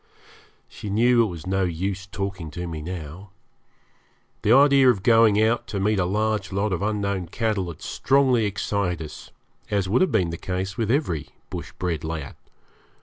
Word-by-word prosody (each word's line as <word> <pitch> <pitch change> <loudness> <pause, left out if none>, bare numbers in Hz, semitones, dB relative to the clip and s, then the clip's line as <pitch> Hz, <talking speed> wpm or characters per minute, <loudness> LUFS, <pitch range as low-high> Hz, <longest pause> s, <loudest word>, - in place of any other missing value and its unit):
She 105 - -8
knew 120 +4 +4
it - - 0
was 85 -5 -8
no 95 +1 0
use 95 +3 -3
talking 95 -5 -5
to 90 - -3
me 80 -3 -5
now. 85 +3 -7 1.1
The 105 - +2
idea 135 0 +6
of 100 -6 +1
going 115 -3 +5
out 110 +2 +2
to 100 - -3
meet 105 +1 +1
a 90 - +2
large 105 0 -1
lot 100 +1 0
of 90 - -2
unknown 100 -3 -1
cattle 105 -1 -1
had 85 -3 -9
strongly 130 -4 +2
excited 100 -4 -2
us, 75 - -11 0.4
as 100 -3 0
would 110 +7 +2
have 185 - +3
been 90 -7 +1
the 85 - -5
case 95 +2 -3
with 110 -1 -1
every 115 - 0 0.2
bush - - -6
bred 85 -4 -3
lad. 80 -3 -5
100 Hz, 175 wpm, -24 LUFS, 90-110 Hz, 1.1 s, idea